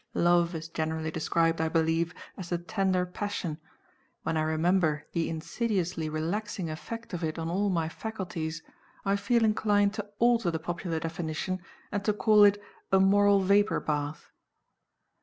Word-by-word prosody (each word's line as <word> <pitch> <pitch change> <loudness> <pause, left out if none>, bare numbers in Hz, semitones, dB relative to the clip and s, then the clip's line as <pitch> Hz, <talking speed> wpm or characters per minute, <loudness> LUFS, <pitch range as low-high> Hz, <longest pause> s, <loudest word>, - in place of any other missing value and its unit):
Love 175 0 +3
is 160 0 -5
generally 160 -1 -2
described, 165 +1 +1
I 160 - +1
believe, 165 +1 +1 0.2
as 180 -3 -7
the 175 - 0
tender 185 0 0
passion. 180 -4 -4 0.6
When - - -1
I 155 - +2
remember 160 0 +1
the 165 -1 -1
insidiously 175 -1 -2
relaxing 170 +3 -3
effect 230 +8 -7
of 175 -1 -3
it 155 0 -2
on 165 0 -3
all 200 +3 +1
my 165 -4 0
faculties, 165 -4 -5 0.4
I 195 0 +3
feel 225 +3 +2
inclined 205 -1 +2
to 210 -1 -5
alter 235 -4 +3
the 165 - -1
popular 170 0 -3
definition, 165 +3 -3 0.3
and 200 - -2
to 210 - +2
call 210 0 +5
it 205 0 +5 0.3
a 190 - +5
moral 200 +1 +5
vapor 200 +2 +3
bath. 145 0 -3
175 Hz, 155 wpm, -29 LUFS, 160-205 Hz, 0.6 s, call